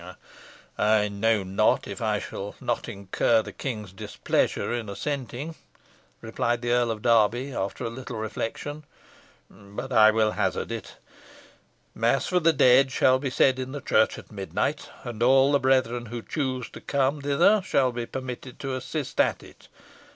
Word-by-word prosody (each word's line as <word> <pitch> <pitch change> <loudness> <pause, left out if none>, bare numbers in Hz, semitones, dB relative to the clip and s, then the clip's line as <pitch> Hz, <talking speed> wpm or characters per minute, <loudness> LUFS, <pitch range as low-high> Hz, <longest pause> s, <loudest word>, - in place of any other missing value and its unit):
"I 105 -1 +3
know 105 +1 +1
not 95 +1 +1
if - - -7
I - - +1
shall 100 +1 -6
not - - -2
incur 100 +3 +1
the - - -8
king's 105 -8 -5
displeasure 95 - -1
in 115 -3 -3
assenting," 140 +6 -4 0.7
replied 120 +1 -1
the 120 - 0
Earl 120 -1 +2
of 110 -2 -4
Derby, 120 +3 +3
after 95 -3 -3
a - - -2
little 125 -1 -7
reflection; 115 +7 -4 0.6
"but 105 +6 -8
I 110 -2 +7
will 110 0 +2
hazard - - -1
it. - - -6 1.0
Mass 115 +4 +1
for 180 - +2
the 165 -1 +4
dead 130 -2 +5
shall 130 0 +3
be 135 0 -2
said 130 0 +3
in 130 +1 -5
the 145 - -4
church 110 -4 +2
at - - -12
midnight, 100 -2 -3
and 120 -2 -7
all 135 +3 +5
the 140 - +4
brethren 130 -2 +1
who 120 +1 -6
choose 130 -5 -3
to - - -11
come 140 +1 0
thither 145 +9 +4
shall 130 -9 +2
be 120 -1 -4
permitted 130 -1 -7
to 135 -2 -3
assist 130 +3 -5
at - - 0
it. - - -16
120 Hz, 165 wpm, -26 LUFS, 110-135 Hz, 1.0 s, I